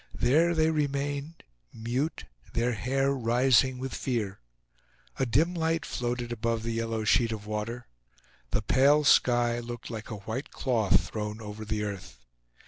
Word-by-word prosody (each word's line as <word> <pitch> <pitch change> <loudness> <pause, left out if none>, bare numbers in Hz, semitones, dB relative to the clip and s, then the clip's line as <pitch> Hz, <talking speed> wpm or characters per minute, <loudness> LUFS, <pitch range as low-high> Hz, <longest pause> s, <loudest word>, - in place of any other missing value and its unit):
There 160 +8 +3
they 160 0 +3
remained, 145 +1 -2 0.3
mute, 125 +8 -2 0.3
their 120 +1 +1
hair 135 +5 0
rising 125 +1 +3
with 130 +1 -5
fear. 110 -7 -2 0.8
A 130 - +1
dim 155 +10 +2
light 165 -1 0
floated 120 0 -3
above 115 -1 -1
the 115 0 -2
yellow 115 -1 -2
sheet 115 +2 +3
of 105 -2 -5
water. 110 +3 -4 0.6
The 105 - -1
pale 140 +6 +4
sky 120 -3 +4
looked 120 0 -7
like 110 -1 -6
a 110 - -4
white 125 +6 -4
cloth 110 -7 +1
thrown 105 0 -4
over 105 0 -7
the 105 0 -2
earth. 95 -11 -6
120 Hz, 145 wpm, -28 LUFS, 110-135 Hz, 0.8 s, pale